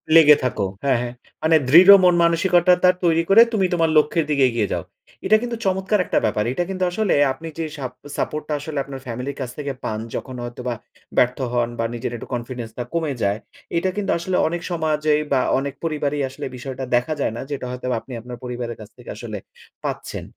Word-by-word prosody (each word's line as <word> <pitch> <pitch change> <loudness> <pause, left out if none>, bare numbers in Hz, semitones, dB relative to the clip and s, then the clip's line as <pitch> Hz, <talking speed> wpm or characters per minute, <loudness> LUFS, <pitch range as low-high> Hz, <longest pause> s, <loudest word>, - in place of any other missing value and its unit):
লেগে 150 -2 +9
থাকো। 125 -4 -1 0.2
হ্যাঁ, 135 -3 +3
হ্যাঁ। 120 0 -4 0.3
মানে 160 +1 +4
দৃঢ় 175 +7 +8
মন 180 -1 +6
মানসিকতাটা 180 +1 +4
তৈরি 165 -1 +3
করে 210 +4 +8
তুমি 195 -3 +2
তোমার 165 -2 +2
লক্ষ্যের 155 +1 +3
দিকে 140 -2 +3
এগিয়ে 115 -4 -1
যাও। - - -2 0.4
এটা 215 - +5
কিন্তু 240 -1 -3
চমৎকার 190 +2 +1
একটা - - +1
ব্যাপার। 105 0 0
এটা 175 - 0
কিন্তু 185 -1 -2
আসলে 205 +2 +1 0.2
আপনি 160 +5 -9
যে 160 - -1
সাপ 130 -3 -5 0.3
সাপোর্ট 150 0 -2
টা - - 0
আসলে 150 0 -6
আপনার 135 -1 -8
ফ্যামিলির 125 +3 -5
কাছ 125 - -3
থেকে 140 -2 -3
পান, 110 0 -2 0.2
যখন 130 -1 -5
হয়তো 120 +1 -7
বা 120 - -1 0.4
ব্যর্থ 125 0 +3 0.2
হন 120 -1 +1
বা 115 - +1
নিজের 120 0 -4
একটু - - -9
কনফিডেন্স 120 -1 -5
টা 120 - -2
কমে 160 -4 -1
যায়। 100 +1 +1 0.4
এইটা 170 +3 +1
কিন্তু 205 - -1
আসলে 180 +2 -2
অনেক 170 +1 -3
সমাজেই 155 -2 +1
বা 130 - +3 0.2
অনেক 140 0 -4
পরিবারেই 150 -3 -1
আসলে - - -7
বিষয়টা 130 +1 -6
দেখা 125 +6 +1
যায় - - 0
না, - - -4
যেটা 135 -3 -3
হয়তো 125 0 -7
আপনি 130 - -11
আপনার 125 0 -8
পরিবারের 120 -1 -5
কাছ 105 - -11
থেকে 125 - -13
আসলে 110 -1 -6 0.5
পাচ্ছেন। - - -4
145 Hz, 205 wpm, -22 LUFS, 125-170 Hz, 0.5 s, লেগে